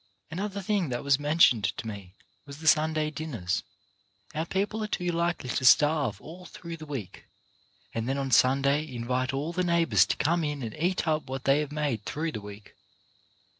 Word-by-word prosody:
Another 200 +3 -4
thing 195 -5 0
that 120 -1 -3
was 140 -1 +3
mentioned 145 -7 +4
to 120 +3 -2
me 100 -3 -8 0.3
was 140 0 -9
the 160 - -11
Sunday 155 0 +3
dinners. 115 - -3 0.7
Our 160 +2 -2
people 205 +4 -1
are - - -2
too 180 -4 -1
likely 170 -5 -1
to - - -1
starve 145 -4 +4
all 175 - -11
through 170 -1 -8
the 155 -1 -10
week, 120 -11 -7 0.7
and 115 +2 -2
then 135 - 0
on 135 -1 -2
Sunday 140 +4 +4
invite 125 +2 -1
all 145 +5 -3
the 180 - 0
neighbours 165 - +3
to - - -1
come 170 +2 +1
in 145 -3 -3
and 110 -2 -5
eat 175 +2 0
up 155 -2 0
what 135 0 -4
they 135 +2 +4
have 150 -1 -3
made 145 -7 -2
through 160 +2 -3
the 110 - -6
week. 100 0 -11
145 Hz, 190 wpm, -28 LUFS, 125-165 Hz, 0.7 s, mentioned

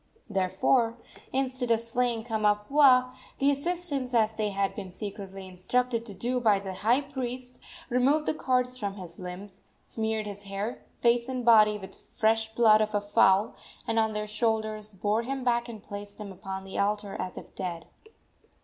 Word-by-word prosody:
Therefore, 215 +4 +1 0.3
instead 260 -2 -1
of 230 -1 +4
slaying 230 0 -1
Kamapuaa, 250 +4 +4 0.2
the 275 +1 +3
assistants, 285 -4 -1
as 220 -1 +3
they 215 -1 -1
had 195 -1 -1
been 195 -3 -7
secretly 195 0 -7
instructed 230 +6 -1
to 200 - -8
do 245 +6 -1
by 215 -4 +4
the 195 -1 -5
high 230 +8 +2
priest, 255 -3 -5 0.3
removed 270 +5 +2
the - - +1
cords 255 -3 0
from 200 -3 -3
his 175 -4 -10
limbs, 185 +2 -8 0.2
smeared 220 -1 -2
his 205 -1 -7
hair, 200 +4 -4 0.2
face 235 +1 +3
and 255 -2 -3
body 215 -2 +6
with 190 -2 -9
the - - -15 0.2
fresh 220 -1 +2
blood 220 -2 +6
of 215 0 -1
a 205 - +2
fowl, 205 0 +3 0.3
and 225 - +1
on 220 -1 +1
their 210 0 -2
shoulders 215 -1 -1
bore 210 +4 +1
him 265 +2 -4
back 240 -1 +1
and 220 -3 -9
placed 205 0 -8
him 205 -2 -7
upon 190 0 -6
the 195 - -5
altar 205 0 0
as 185 - -4
if - - -10
dead. 175 -3 -5
220 Hz, 175 wpm, -28 LUFS, 200-250 Hz, 0.3 s, body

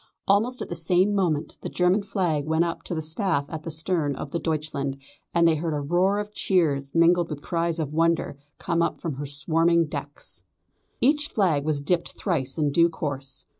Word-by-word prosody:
Almost 225 +6 +2
at - - -8
the - - -5
same 180 +4 +2
moment 170 -7 -1
the - - -4
German 180 +3 +2
flag 180 -7 -1
went 160 +1 +2
up 170 - -4
to 175 - -3
the 160 - -3
staff 160 -2 0
at 160 -2 -5
the 165 - -6
stern 160 -2 -1
of 140 - -6
the 170 - -1
Deutschland, 150 -4 -2 0.3
and 170 0 +4
they 165 - +4
heard 160 0 -2
a - - -1
roar 175 +7 +2
of 210 0 -4
cheers, 145 -9 +1
mingled 170 +1 +4
with 150 -2 -6
cries 170 -1 -1
of 150 -3 -3
wonder, 165 -1 +1 0.2
come 170 -2 0
up 170 - 0
from 155 -6 -4
her 145 0 -4
swarming 165 +4 +2
decks. 145 -1 -7 0.6
Each 295 +3 +3
flag 165 -9 +1
was 150 -2 0
dipped 170 +4 -1
thrice 140 -9 -1
in 150 -2 +1
due 170 +3 +4
course. 135 -4 -5
165 Hz, 200 wpm, -25 LUFS, 145-180 Hz, 0.6 s, and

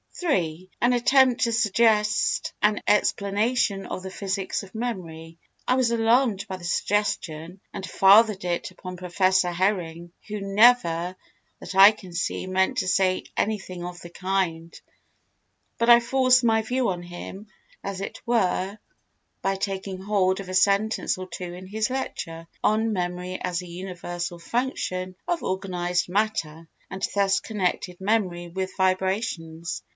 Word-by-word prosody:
An 185 - 0
attempt 255 0 +4
to 235 - +2
suggest 215 -1 +2
an 210 0 +2
explanation 205 0 +1
of 185 - -5
the 190 - -6
physics 195 0 -3
of 195 +1 -13
memory. 170 -8 -5 0.3
I 250 - +3
was 255 -2 +2
alarmed 230 -2 +2
by 190 -1 -5
the 180 - -14
suggestion 180 -3 -1
and 190 - -5
fathered 200 +1 +5
it 175 -1 -2
upon 185 -1 -9
Professor 185 0 +2
Hering 175 -2 -1 0.2
who 210 -1 -5
never, 195 -4 +3 0.4
that - - -8
I 195 +2 +10
can 190 -5 -12
see, 180 +2 -2
meant 185 0 +1
to 185 - -1
say 185 0 +2
anything 190 -4 -2
of 175 0 -7
the 175 - -9
kind, 180 -3 -2 1.0
but 230 - +2
I 235 0 +9
forced 255 +1 +3
my 225 -1 +3
view 245 +2 0
on 180 -2 -3
him, 175 +4 -9 0.4
as 195 -1 -4
it 195 - -6
were, 200 -4 0 0.6
by 195 0 0
taking 195 -1 -4
hold 190 -2 +1
of 195 -2 -7
a - - -5
sentence 200 +3 +2
or 185 0 -6
two 175 0 -6
in 180 +1 -9
his 215 +4 -2
lecture, 165 -10 -5 0.2
on 220 +1 +2
Memory 180 0 -3
as 180 -1 -2
a - - -10
Universal 175 -1 -6
Function 185 -4 -2
of 345 -1 0
Organised 180 -2 -1
Matter 175 -6 -1 0.2
and 190 +1 -2
thus 195 -1 +3
connected 180 -4 -2
memory 190 -4 0
with 190 +2 -4
vibrations. 185 -3 -1
190 Hz, 145 wpm, -25 LUFS, 180-215 Hz, 1.0 s, I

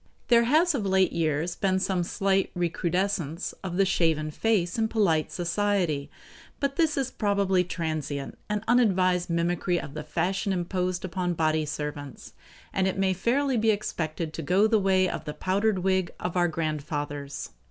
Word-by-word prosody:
There 235 -1 +6
has 315 +7 +4
of 255 -7 -1
late 190 -1 +3
years 160 +1 0
been 190 -1 +1
some 185 -1 0
slight 195 +2 +1
recrudescence 175 -1 -1
of 180 -2 -4
the 195 - +4
shaven 160 -4 +1
face 195 0 0
in 220 - +2
polite 185 -9 +1
society, 175 -5 0 0.5
but 275 -1 -1
this 315 -2 +2
is 265 -2 -1
probably 200 -3 +1
a - - -2
transient 155 -5 -3
and 210 0 -1
unadvised 185 -7 +3
mimicry 175 +1 0
of 140 - -8
the 155 - -5
fashion 185 +6 -1
imposed 180 0 -2
upon 180 -1 -2
body 155 -1 +1
servants, 150 -2 -6 0.4
and 190 0 +1
it 190 - -1
may 190 -1 +2
fairly 255 +7 +1
be 225 0 +2
expected 165 -6 -2
to - - -4
go 185 +7 +3
the 220 0 +3
way 190 -1 +3
of 170 -3 -4
the 150 - -5
powdered 200 +2 +1
wig 190 -2 +1
of 180 - -3
our 175 -1 +3
grandfathers. 145 -3 -4
180 Hz, 165 wpm, -27 LUFS, 160-200 Hz, 0.5 s, There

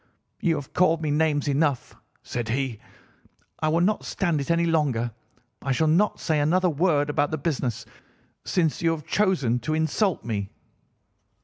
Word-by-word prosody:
"'You 165 -3 +1
have 145 -2 -7
called 165 -2 +3
me 150 - 0
names 150 -1 +1
enough,' 145 -2 0 0.3
said 120 -2 -4
he, 125 -2 -1 0.8
'I 155 - 0
will 165 +2 +2
not 210 +4 +1
stand 170 -6 -1
it 140 - -6
any 170 0 +2
longer. 140 -8 +1 0.5
I 135 - -2
shall 160 +5 +1
not 175 +7 +2
say 155 -2 0
another 175 +5 +2
word 150 -2 +2
about 145 -1 +1
this 155 -2 -4
business, 130 -7 -2 0.6
since 165 -5 0
you 165 - +3
have 155 -3 -7
chosen 170 - +1
to 155 +7 -2
insult 160 - 0
me. 100 -4 -3
155 Hz, 165 wpm, -25 LUFS, 135-165 Hz, 0.8 s, called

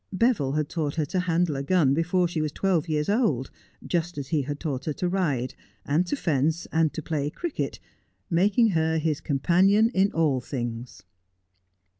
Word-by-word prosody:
Beville 190 - +1
had 150 0 0
taught 150 -3 -3
her 155 -2 0
to 185 +6 -2
handle 175 -3 +1
a 135 - -2
gun 145 -2 +3
before 175 +3 +1
she 165 -2 -2
was 155 -1 -1
twelve 175 -2 0
years 150 -1 0
old, 200 - +1 0.3
just 175 -1 -2
as 140 -1 -5
he 155 -3 +1
had 145 +2 -5
taught 140 -5 -3
her 155 - -1
to 180 - -2
ride, 150 -10 -1 0.3
and 160 +6 +1
to - - 0
fence, 160 - 0
and 160 -2 +2
to 160 - -5
play 145 -2 -2
cricket, 340 - -4 0.5
making 205 +6 +3
her 160 -3 +1
his 155 -2 -1
companion 185 - +3
in 195 +1 +3
all 150 -6 +1
things. 120 -2 -5
160 Hz, 180 wpm, -26 LUFS, 145-180 Hz, 0.5 s, gun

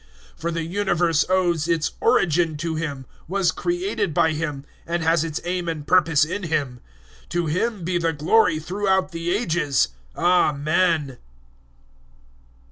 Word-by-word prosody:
011:036 - - -29
For 170 - -1
the 165 0 -2
universe 175 -3 +1
owes 175 -4 +1
its 165 -2 0
origin 165 -1 +2
to 165 +1 -3
Him, 145 -4 -4 0.2
was 190 +1 +1
created 350 - -2
by 160 - +3
Him, 150 -3 -4 0.2
and 170 0 -1
has 165 0 +3
its 160 -2 -3
aim 175 0 -2
and 155 -3 -5
purpose 165 -5 +4
in 185 +6 -4
Him. 145 -8 -2 0.5
To 175 -1 -1
Him 185 +5 -1
be 175 +1 0
the 165 -1 +1
glory 165 +3 +3
throughout 190 +4 0
the 165 0 -4
Ages! 170 - +1 0.3
Amen. 155 -3 +2
165 Hz, 140 wpm, -23 LUFS, 155-180 Hz, 0.5 s, purpose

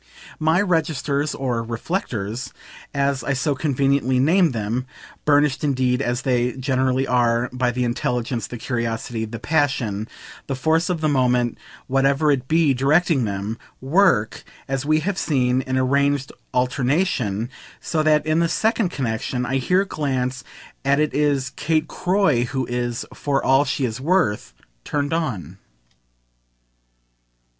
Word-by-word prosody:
My 160 +3 +3
registers 155 -5 0
or 125 -4 -1
"reflectors," 115 - -3 0.4
as 140 -2 0
I 135 - 0
so 135 +2 0
conveniently 135 -2 +1
name 165 +7 +4
them 120 +1 -3 0.4
(burnished 145 -1 +3
indeed 130 -2 +1
as 120 -1 -1
they 125 -1 +1
generally 130 0 0
are 120 -1 +1
by 125 -1 +1
the 125 +1 -1
intelligence, 120 0 -2
the 120 - -7
curiosity, 115 -1 -3
the 115 +1 -7
passion, 125 -7 0 0.4
the 135 - -2
force 160 +5 +1
of 175 -3 -1
the 155 - +2
moment, 125 -4 +1 0.3
whatever 135 +3 +2
it 130 -3 -1
be, 160 -2 +3
directing 140 +1 +2
them), 100 +2 -4 0.2
work, 135 - +2 0.2
as 135 +1 -2
we 155 0 +3
have 190 +3 -2
seen, 130 -3 +1
in 130 0 -2
arranged 140 +1 +1 0.2
alternation; 125 - 0 0.3
so 160 - -1
that 155 -1 +3
in 155 +1 +2
the 170 0 +2
second 220 -1 +1
connexion 125 -3 -2
I 130 +2 0
here 180 +9 +2
glance 130 -7 -2 0.4
at 140 +1 +2
it 150 0 +1
is 140 -3 +1
Kate 155 +2 0
Croy 175 -11 +1
who 130 +1 -2
is, 120 -1 -3
"for 140 -2 -1
all 135 +2 +4
she 140 -1 -1
is 120 +1 -4
worth," 155 - +1 0.3
turned 145 0 -2
on. 100 - -3
135 Hz, 140 wpm, -22 LUFS, 125-150 Hz, 0.4 s, name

